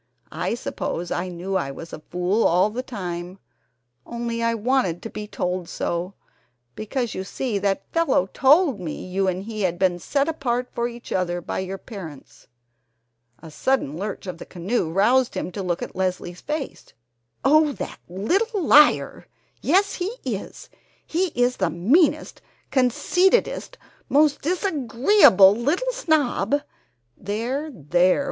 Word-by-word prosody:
I - - -2
suppose 175 -7 -4
I 180 - -1
knew 180 +2 -4
I 140 -7 0
was 165 +4 -9
a - - -6
fool 180 +5 +1
all 180 +5 +3
the 245 +4 -3
time, 180 -6 -6 0.7
only 235 -1 -4
I 230 0 +1
wanted 225 -7 0
to 225 - -6
be 210 0 -6
told 180 -3 -3
so, 175 +3 -3 0.6
because 235 - -3
you 190 - -4
see 215 +2 -3
that 195 0 -1
fellow 330 - +2
told 285 - +4
me 165 -4 -6
you 190 +1 -1
and 185 +1 -1
he 215 0 -5
had 175 -3 0
been 180 -1 +1
set 280 - 0
apart 250 -6 -1
for 235 0 -1
each 240 0 -10
other 175 -1 0
by 175 - -4
your 190 +1 -4
parents 180 - -11 0.5
!" 120 +2 -40
A 160 - -10
sudden 205 - 0
lurch 200 +4 -5
of 180 -3 -6
the - - -8
canoe 180 0 -2
roused 235 +8 +3
him - - -3
to 195 - -5
look 175 -2 -2
at - - -8
Leslie's 180 -1 -3
face: 300 -2 -5 0.5
"Oh, 305 +2 +5
that - - -7
little 380 - 0
liar! 300 0 +4 0.3
Yes, 385 +7 +3
he 360 - -3 0.2
is! - - -5 0.4
He 360 +4 0
is 245 +1 +2
the - - +1
meanest, 230 - +2 0.3
conceitedest, 360 - +2 0.3
most 290 0 +3
disagreeable 285 - +5
little 315 - 0
snob 290 - +1 0.3
!" 120 0 -47
"There, 240 +10 -3
there! 175 - +2
215 Hz, 150 wpm, -23 LUFS, 180-275 Hz, 0.7 s, Oh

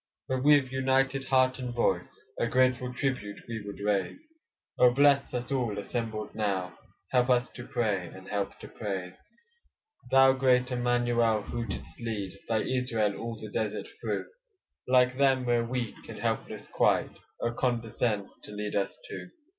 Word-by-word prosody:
But 130 0 -1
with 145 -2 +5
united 135 +1 +1
heart 130 0 +3
and 125 -2 -4
voice, 120 - 0 0.2
A 115 - +2
grateful 125 0 +2
tribute 125 -6 -2
we 115 -2 -4
would 100 0 -8
raise; 100 -2 0 0.6
Oh 125 - +8
bless 140 +2 +4
us 125 +2 -3
all 120 -6 0
assembled 110 +1 -3
now, 95 -4 -1 0.4
Help 125 0 +3
us 125 -1 +3
to 120 - -9
pray, 105 -7 0
and 95 +2 -12
help 100 -1 -2
to - - -8
praise. 95 -4 -5 0.9
Thou 135 0 +7
great 130 -1 +3
Immanuel, 120 -3 +2
who 115 +2 -4
didst 80 -5 -7
lead 105 -5 -3 0.2
Thy 110 -2 +2
Israel 115 -5 0
all 115 +1 -5
the 110 - -8
desert 105 -1 -2
through; - - -2 0.6
Like 125 0 +4
them 135 -2 +4
we're 120 -1 +2
weak 120 -2 -4
and - - -7
helpless - - -3
quite, - - +2 0.2
Oh! 120 - 0
condescend 115 -4 -1
to - - -9
lead 105 0 -4
us 100 -1 -1
too. - - -7
120 Hz, 155 wpm, -29 LUFS, 105-130 Hz, 0.9 s, Oh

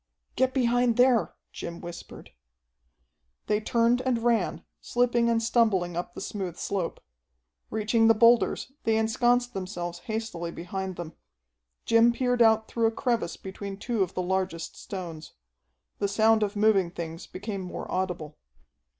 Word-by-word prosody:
"Get 260 0 +2
behind 245 -2 +2
there!" 250 -2 +3 0.2
Jim 170 0 -7
whispered. 175 0 -10 1.1
They 210 0 +1
turned 235 +2 +2
and 250 -3 0
ran, 235 -2 +1
slipping 240 -1 +1
and 230 -1 +1
stumbling 210 -7 +2
up 175 0 -4
the - - -6
smooth 185 -5 -4
slope. 190 -4 -3 0.7
Reaching 225 +1 +2
the 225 - +6
boulders, 235 +3 +4
they 225 -1 +2
ensconced 240 +2 +2
themselves 175 -2 -5
hastily 220 -7 -4
behind 185 +2 -5
them. 170 -2 -7 0.7
Jim 230 +1 +5
peered 245 0 0
out 220 -1 +5
through 230 -1 +1
a - - +1
crevice 230 -7 -1
between 195 +1 -7
two 230 +1 -2
of 190 -1 -1
the 185 - -1
largest 185 -2 -2
stones. 170 -5 -7 0.7
The 200 - +1
sound 220 +2 +3
of 205 -1 -1
moving 205 -4 +3
things 170 0 -7
became 200 +1 -5
more 180 -1 -6
audible. 180 -5 -3
215 Hz, 140 wpm, -27 LUFS, 180-235 Hz, 1.1 s, the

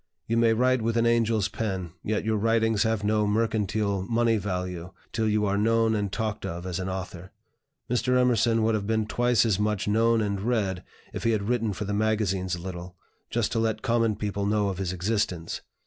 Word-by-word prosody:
You 115 - -1
may 115 -1 +4
write 130 +1 +2
with 115 +1 0
an 115 - +3
angel's 115 -3 +2
pen, 100 -5 -3
yet 105 0 -1
your 110 -1 +1
writings 115 0 +2
have 110 -2 +1
no 105 0 +2
mercantile 105 -2 0
money 115 +3 +1
value 90 -3 -4 0.2
till 110 -1 +1
you 105 0 +1
are 100 0 +1
known 115 +1 +3
and 100 -3 -1
talked 110 0 -3
of 85 +2 -5
as 90 -1 -3
an 95 0 -3
author. 95 -1 -6 0.6
Mr. 125 +1 +1
Emerson 115 -2 +3
would 110 +1 +2
have 105 -2 -1
been 110 -1 +1
twice 120 +1 +2
as 105 -4 +1
much 105 -1 0
known 115 +2 +3
and 100 -2 -1
read, 100 -5 -1 0.3
if - - -5
he 115 - +2
had 105 -2 0
written 115 0 0
for 105 +2 -4
the 105 - -3
magazines 100 -4 0
a - - -8
little, 90 -1 -7 0.3
just - - 0
to - - 0
let 110 +1 -1
common 115 -3 +2
people 100 -1 -2
know 105 -1 +1
of 95 -1 -4
his 95 -2 -1
existence. 90 -3 -2
105 Hz, 205 wpm, -26 LUFS, 100-115 Hz, 0.6 s, may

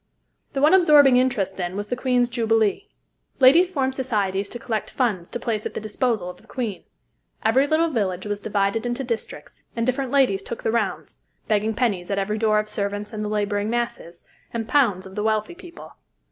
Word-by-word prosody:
The 275 0 -1
one 305 - +6
absorbing 295 -8 +6
interest, 230 -7 0
then, 180 0 -3
was 205 0 -4
the 245 - 0
Queen's 250 -1 +1
Jubilee. 225 - 0 0.5
Ladies 310 +8 +6
formed 265 -6 -1
societies 205 -7 -1
to - - -7
collect 225 -3 -3
funds 205 -9 -1
to 240 - -5
place 220 -3 -2
at - - -12
the - - -2
disposal 215 -2 -1
of 180 - -9
the - - -23
Queen. 230 -7 -4 0.6
Every 260 +6 +4
little 320 +2 +2
village 190 -7 -1
was 205 0 -3
divided 205 +3 0
into 240 +2 -2
districts, 235 -3 -6
and 230 -1 -1
different 255 +1 -1
ladies 255 -8 +2
took 235 +4 -7
the - - +1
rounds, 235 - -2 0.3
begging 215 +1 +1
pennies 200 -7 -1
at 200 - -1
every 210 +2 -1
door 215 -1 +3
of 210 0 0
servants 205 +1 -3
and 215 0 -4
the 210 - -3
laboring 205 0 -1
masses, 235 -8 -4 0.3
and 225 -1 -4
pounds 215 -11 +2
of 190 - -11
the 210 - -3
wealthy 215 +6 0
people. 345 -1 -12
225 Hz, 195 wpm, -23 LUFS, 205-255 Hz, 0.6 s, one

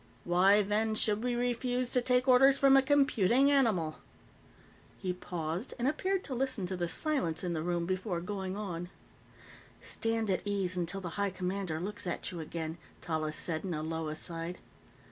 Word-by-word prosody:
"Why, 190 +4 +5
then, 215 +2 0
should 215 0 +1
we 245 -1 0
refuse 245 +1 -1
to 250 - +2
take 250 +1 +2
orders 265 +2 +6
from 275 -1 +6
a 270 - +7
computing 270 -2 +3
animal?" 210 - +2 1.0
He 185 -2 -2
paused 175 +3 -4
and 245 +1 0
appeared 375 +6 0
to 275 - -5
listen 255 -6 0
to 185 +1 -2
the 175 -1 -1
silence 190 - -1
in 175 -1 -1
the 160 - -2
room 170 0 -1
before 185 0 -2
going 190 +1 -4
on. 175 -4 -4 0.9
"Stand 225 -2 -1
at 185 - 0
ease 195 -3 -1
until 180 +2 -2
the 180 - -4
High 200 - +2
Commander 185 -3 -3
looks 200 +2 -5
at 175 - -3
you 175 - -6
again," 160 +1 -5 0.2
Tallis 155 -2 -2
said 160 -2 -1
in 180 -4 -2
a 155 - -3
low 160 0 -3
aside. 165 +2 -4
195 Hz, 175 wpm, -31 LUFS, 170-245 Hz, 1.0 s, a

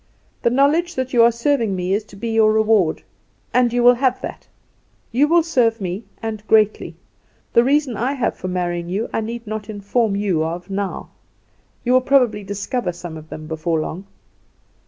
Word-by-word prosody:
The - - +3
knowledge 300 +7 +2
that 260 0 -3
you 240 - +5
are 235 +1 +6
serving 235 -3 0
me 180 +1 -1
is 210 +2 0
to 205 - -15
be 230 +4 -4
your 220 -1 +4
reward; 215 -6 +2 0.5
and 250 -1 +3
you 245 0 +1
will 245 +1 +8
have 255 0 +1
that. - - -7 0.6
You 270 +6 +3
will 335 +1 +4
serve 240 -8 +1
me, 190 +3 -4 0.2
and 220 -2 -4
greatly. 215 -1 +2 0.6
The 235 - +6
reasons 275 -3 +1
I 255 +4 0
have 265 -4 -1
for - - -6
marrying 175 -1 -2
you 205 +6 -2
I - - 0
need 230 +2 -6
not 215 0 -5
inform 205 +1 0
you 195 -6 0
of 170 +4 -5
now; 195 -1 -4 0.7
you 250 - +1
will 255 - +5
probably 250 -6 +2
discover 205 +2 -3
some 175 -1 -8
of 155 0 -11
them 155 - -8
before 160 +1 -1
long." 180 +5 -5
220 Hz, 185 wpm, -20 LUFS, 190-245 Hz, 0.7 s, will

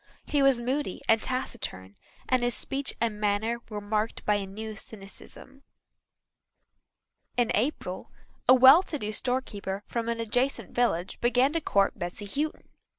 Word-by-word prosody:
He 290 - +1
was 270 -3 +4
moody 255 -3 -2
and 225 0 +4
taciturn 225 - -4 0.3
and 255 -1 +2
his 245 0 +2
speech 275 0 -2
and 225 -2 -1
manner 210 +3 0
were 210 -2 -4
marked 210 +2 -2
by 210 - +3
a 200 -1 -1
new 215 +3 -6
cynicism. 215 +6 -12 1.8
In 245 -2 +2
April 210 -6 -2 0.4
a 255 - +9
well 265 +6 +9
to 325 -5 -5
do 215 -5 -3
storekeeper 210 -5 -2
from 235 -1 -3
an 230 0 -2
adjacent 245 +4 0
village 195 -8 0
began 250 +4 +3
to 330 - 0
court 200 -8 +1
Bessy 175 +4 -5
Houghton. 295 +9 -3
230 Hz, 150 wpm, -28 LUFS, 205-260 Hz, 1.8 s, a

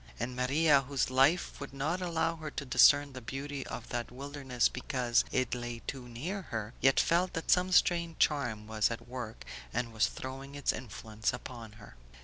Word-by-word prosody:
And 125 0 -3
Maria, 140 +3 +4
whose 135 -1 -1
life 135 +7 +3
would 140 0 -8
not 155 +7 -1
allow 165 -1 0
her 155 -1 -6
to 140 - -5
discern 140 +2 +5
the 130 - -7
beauty 135 +3 -5
of 120 - -7
that 120 -1 -3
wilderness 135 -2 -1
because 125 -1 +1
it 130 -1 0
lay 120 -1 -5
too 130 -3 -5
near 170 +13 -4
her, 110 0 -4
yet 135 0 +5
felt 175 +2 +2
that 165 - -1
some 180 0 +3
strange 170 -2 +3
charm 120 -8 +1
was 110 -1 +1
at 115 0 -6
work 120 -3 -7 0.3
and 120 -1 -2
was 110 - +3
throwing 135 +2 -7
its 145 - +1
influence 110 -2 -3
about 120 -3 -8
her. 60 - -14
130 Hz, 180 wpm, -31 LUFS, 120-145 Hz, 0.3 s, discern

